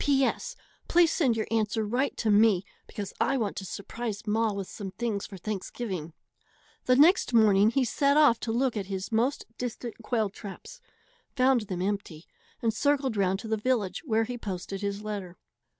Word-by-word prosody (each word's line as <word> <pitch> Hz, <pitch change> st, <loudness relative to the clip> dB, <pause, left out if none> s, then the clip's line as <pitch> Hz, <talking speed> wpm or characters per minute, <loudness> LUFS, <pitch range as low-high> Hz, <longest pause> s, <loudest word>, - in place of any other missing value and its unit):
P. 275 Hz, -1 st, +3 dB
S. -, -, -3 dB, 0.3 s
Please 345 Hz, -1 st, +5 dB
send 255 Hz, -9 st, +2 dB
your 220 Hz, -, 0 dB
answer 220 Hz, -1 st, 0 dB
right 250 Hz, +6 st, -1 dB
to 220 Hz, -, +1 dB
me, 205 Hz, -3 st, +4 dB, 0.2 s
because 200 Hz, -2 st, -6 dB
I 270 Hz, -, +2 dB
want 215 Hz, -5 st, -1 dB
to 190 Hz, -, -4 dB
surprise 215 Hz, +3 st, -5 dB
ma 220 Hz, +1 st, +1 dB
with 200 Hz, -2 st, -4 dB
some 200 Hz, -2 st, -7 dB
things 205 Hz, +1 st, -3 dB
for 195 Hz, -, -9 dB
Thanksgiving. 190 Hz, -3 st, -5 dB, 0.7 s
The 255 Hz, -, +4 dB
next 300 Hz, -2 st, +5 dB
morning 210 Hz, -2 st, +6 dB
he 260 Hz, +2 st, +1 dB
set 280 Hz, +4 st, +2 dB
off 290 Hz, -7 st, +5 dB
to 225 Hz, -, -3 dB
look 245 Hz, +1 st, +1 dB
at 200 Hz, -3 st, -3 dB
his 190 Hz, +1 st, -4 dB
most 235 Hz, +5 st, +1 dB
distant 245 Hz, -1 st, -4 dB
quail 220 Hz, -3 st, 0 dB
traps, 220 Hz, -, -10 dB, 0.5 s
found 255 Hz, -4 st, +3 dB
them 180 Hz, -1 st, -3 dB
empty, 190 Hz, -5 st, -3 dB, 0.4 s
and 225 Hz, -1 st, +2 dB
circled 275 Hz, -1 st, +1 dB
round 190 Hz, -2 st, +1 dB
to 225 Hz, -, -7 dB
the 220 Hz, 0 st, 0 dB
village, 215 Hz, -4 st, 0 dB
where 225 Hz, -6 st, +1 dB
he 245 Hz, +2 st, -5 dB
posted 195 Hz, -1 st, -5 dB
his 200 Hz, 0 st, -3 dB
letter. 200 Hz, -4 st, -5 dB
220 Hz, 180 wpm, -28 LUFS, 200-250 Hz, 0.7 s, morning